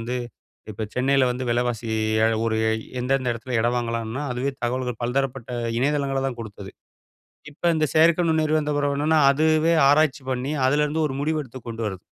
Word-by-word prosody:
வந்து 120 Hz, +2 st, -3 dB, 0.5 s
இப்ப 110 Hz, +1 st, -4 dB
சென்னையில 135 Hz, +1 st, +3 dB
வந்து 125 Hz, +1 st, -3 dB
விலவாசி 120 Hz, -1 st, -1 dB, 0.4 s
ஏக 115 Hz, -, +3 dB
ஒரு 110 Hz, -1 st, 0 dB, 0.4 s
எந்தெந்த 130 Hz, 0 st, 0 dB
இடத்தில 120 Hz, +1 st, -4 dB
இடம் 120 Hz, +2 st, +1 dB
வாங்கலான்னா, 115 Hz, +2 st, -3 dB
அதுவே 125 Hz, +3 st, -1 dB
தகவல்கள் 125 Hz, -1 st, -2 dB
பலதரப்பட்ட 130 Hz, 0 st, -2 dB, 0.3 s
இணையதளங்கள 140 Hz, 0 st, 0 dB
தான் 125 Hz, -3 st, -4 dB
குடுத்தது. 100 Hz, -3 st, -9 dB, 0.8 s
இப்ப 145 Hz, -, -25 dB
இந்த 155 Hz, -1 st, +2 dB
செயற்கை 165 Hz, +2 st, +5 dB
நுண்ணறிவு 155 Hz, -1 st, +2 dB
வந்த 150 Hz, 0 st, -2 dB
பிறகு 145 Hz, -1 st, 0 dB
என்னன்னா, 155 Hz, +1 st, +3 dB
அதுவே 155 Hz, +3 st, +2 dB, 0.2 s
ஆராய்ச்சி 145 Hz, -2 st, +3 dB
பண்ணி 130 Hz, +4 st, -2 dB
அதிலேருந்து 150 Hz, +2 st, +1 dB
ஒரு 135 Hz, -, -5 dB
முடிவு 155 Hz, +1 st, 0 dB
எடுத்து 130 Hz, 0 st, -11 dB
கொண்டு 115 Hz, 0 st, -5 dB
வருது. 95 Hz, -3 st, -7 dB
130 Hz, 165 wpm, -23 LUFS, 120-150 Hz, 0.8 s, செயற்கை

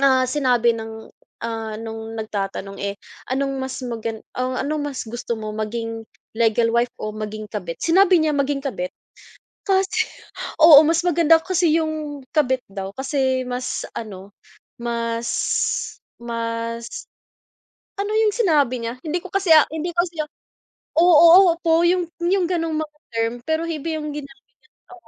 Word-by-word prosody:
Na 260 Hz, -2 st, +4 dB
sinabi 250 Hz, -4 st, +2 dB
ng, 220 Hz, 0 st, -8 dB, 0.3 s
ah, 225 Hz, -1 st, -4 dB
no'ng 225 Hz, 0 st, -7 dB
nagtatanong 195 Hz, -2 st, -4 dB
eh, 200 Hz, 0 st, -2 dB, 0.4 s
anong 275 Hz, +1 st, -1 dB
mas 265 Hz, 0 st, -4 dB
magan 225 Hz, -2 st, -4 dB
o 255 Hz, 0 st, -2 dB
anong 300 Hz, +1 st, -1 dB
mas 270 Hz, -, -5 dB
gusto 235 Hz, +1 st, -4 dB
mo, 215 Hz, -1 st, -5 dB
maging 225 Hz, +1 st, -4 dB, 0.3 s
legal 230 Hz, 0 st, +3 dB
wife 235 Hz, +1 st, +1 dB
o 215 Hz, -, -3 dB
maging 215 Hz, 0 st, -5 dB
kabit? 180 Hz, -6 st, -4 dB
Sinabi 370 Hz, +2 st, +5 dB
niya 310 Hz, -1 st, +1 dB
maging 280 Hz, 0 st, 0 dB
kabit. 180 Hz, -10 st, -3 dB, 0.8 s
Kasi 385 Hz, 0 st, +2 dB, 0.6 s
oo, 310 Hz, -2 st, +10 dB
mas 330 Hz, +1 st, +2 dB
maganda 330 Hz, -1 st, +5 dB
kasi 335 Hz, -2 st, +2 dB
yung 310 Hz, -2 st, -3 dB, 0.2 s
kabit 260 Hz, -4 st, +2 dB
daw, 195 Hz, -1 st, -6 dB
kasi 265 Hz, -1 st, 0 dB
mas 250 Hz, 0 st, -3 dB
ano, 200 Hz, -3 st, -7 dB, 0.5 s
mas 235 Hz, -1 st, -2 dB, 1.0 s
mas 230 Hz, 0 st, -3 dB, 1.1 s
ano 405 Hz, +1 st, -2 dB
yung 435 Hz, -1 st, +4 dB
sinabi 310 Hz, -, +2 dB
niya? 230 Hz, +1 st, -4 dB
Hindi 325 Hz, +2 st, -2 dB
ko 355 Hz, -, -10 dB
kasi, 390 Hz, -2 st, -1 dB
ah, 310 Hz, -2 st, +8 dB
hindi 320 Hz, +2 st, -2 dB
ko 345 Hz, 0 st, +2 dB
siya 330 Hz, -3 st, -4 dB, 0.7 s
oo, 340 Hz, +1 st, +7 dB
opo, 330 Hz, -1 st, +2 dB
yung 350 Hz, -1 st, +1 dB
yung 360 Hz, +1 st, +2 dB
gano'ng 330 Hz, -3 st, -1 dB
mga 305 Hz, -1 st, -5 dB, 0.2 s
term, 230 Hz, +1 st, 0 dB
pero 315 Hz, 0 st, 0 dB
iba 325 Hz, 0 st, -3 dB
yung 300 Hz, -1 st, -4 dB
ginamit 275 Hz, -3 st, -9 dB, 0.5 s
na -, -, -12 dB
265 Hz, 145 wpm, -22 LUFS, 230-325 Hz, 1.1 s, oo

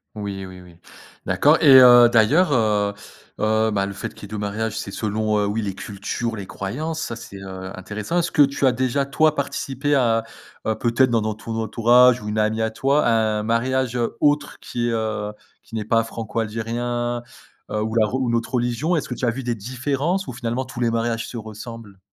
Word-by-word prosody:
Oui, 100 Hz, -2 st, -5 dB
oui, 95 Hz, -1 st, -11 dB
oui. 90 Hz, -1 st, -16 dB, 0.5 s
D'accord. -, -, +4 dB
Et 135 Hz, -, +8 dB
heu, 120 Hz, -1 st, +8 dB
d'ailleurs, 120 Hz, +10 st, +4 dB
heu, 105 Hz, -5 st, +2 dB, 0.5 s
heu, 110 Hz, +1 st, +2 dB
ben, 100 Hz, -2 st, 0 dB
le 100 Hz, -, -5 dB
fait 100 Hz, -, -6 dB
qu'il -, -, -15 dB
y -, -, -5 dB
ait -, -, -10 dB
2 105 Hz, -, -5 dB
mariages, 105 Hz, +2 st, -3 dB
c'est 110 Hz, -, -4 dB
selon, 110 Hz, +1 st, -1 dB
heu, 105 Hz, -, +1 dB
oui, 105 Hz, +2 st, -1 dB
les 100 Hz, -3 st, -4 dB
cultures, 110 Hz, +4 st, -4 dB
les 100 Hz, -3 st, -7 dB
croyances. 150 Hz, -, -4 dB
Ça 120 Hz, -, -4 dB
c'est, 115 Hz, -4 st, -10 dB
heu, 95 Hz, -1 st, -8 dB
intéressant. 105 Hz, -, -4 dB
Est-ce 175 Hz, -, 0 dB
que 150 Hz, -, +3 dB
tu 140 Hz, 0 st, +3 dB
as 130 Hz, -, +5 dB
déjà, 130 Hz, +2 st, 0 dB
toi, 155 Hz, +2 st, +2 dB
participé 140 Hz, 0 st, -2 dB
à 115 Hz, -4 st, +2 dB, 0.4 s
à 110 Hz, -, 0 dB
peut-être 120 Hz, +3 st, +2 dB
dans 115 Hz, -1 st, +2 dB
non 110 Hz, -, -1 dB
entou 110 Hz, +2 st, -6 dB
ton 115 Hz, -, -1 dB
entourage 120 Hz, +2 st, +4 dB
ou 105 Hz, -, -5 dB
une 105 Hz, +1 st, -1 dB
amie 110 Hz, +1 st, +1 dB
à 110 Hz, 0 st, 0 dB
toi, 140 Hz, +6 st, +1 dB
à 120 Hz, -, +3 dB, 0.3 s
un -, -, -3 dB
mariage, 125 Hz, +2 st, 0 dB
heu, 120 Hz, -1 st, -2 dB
autre 145 Hz, 0 st, +1 dB
qui, 120 Hz, 0 st, -3 dB
heu, 110 Hz, -2 st, -2 dB, 0.3 s
qui -, -, -11 dB
n'est 110 Hz, -2 st, -3 dB
pas 115 Hz, +1 st, +2 dB
franco-algérien, 115 Hz, +2 st, -3 dB, 0.5 s
heu, 105 Hz, -, -2 dB
ou 110 Hz, 0 st, -3 dB
la 110 Hz, -2 st, +4 dB
rou 130 Hz, +3 st, -1 dB
une 115 Hz, -, +1 dB
autre 115 Hz, +3 st, -2 dB
religion? 120 Hz, +8 st, 0 dB
Est-ce 155 Hz, -, -2 dB
que -, -, -2 dB
tu 125 Hz, -, -2 dB
as -, -, +3 dB
vu 130 Hz, +3 st, -6 dB
des 120 Hz, -1 st, -1 dB
différences 135 Hz, -, -2 dB
ou -, -, -5 dB
finalement 120 Hz, +1 st, -3 dB
tous 130 Hz, -2 st, -9 dB
les 120 Hz, -1 st, +2 dB
mariages 115 Hz, 0 st, -1 dB
se 120 Hz, -, -7 dB
ressemblent? 110 Hz, -2 st, -9 dB
115 Hz, 220 wpm, -22 LUFS, 105-125 Hz, 0.5 s, Et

